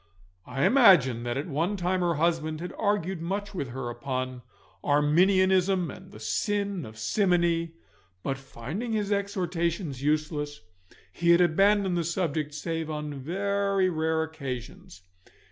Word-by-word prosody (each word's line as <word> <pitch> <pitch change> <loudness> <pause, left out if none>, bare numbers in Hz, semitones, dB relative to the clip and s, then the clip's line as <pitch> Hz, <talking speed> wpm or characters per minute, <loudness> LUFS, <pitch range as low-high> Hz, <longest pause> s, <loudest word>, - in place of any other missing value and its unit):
I 135 +2 0
imagine 175 - +6
that 120 +1 -2
at 140 - -2
one 170 +7 -1
time 185 +1 0
her 175 -2 +1
husband 160 -1 0
had 175 +2 -6
argued 195 -4 -1
much 200 +4 -3
with 160 -8 -3
her 125 +1 -5
upon 130 +1 -4 0.4
Arminianism 185 +4 +3
and - - -12
the 105 - -12
sin 200 - -1
of 110 0 -12
simony, 170 - +1 0.5
but 135 -1 -2
finding 140 - -5
his 210 -1 -1
exhortations 175 -7 -1
useless, 150 - -1 0.5
he 170 0 0
had 170 0 +7
abandoned 190 +2 +3
the - - 0
subject 160 -3 -2
save 160 +1 -3
on 150 -1 -4
very 195 +6 0
rare 160 0 0
occasions. 130 - -7
165 Hz, 135 wpm, -27 LUFS, 145-190 Hz, 0.5 s, had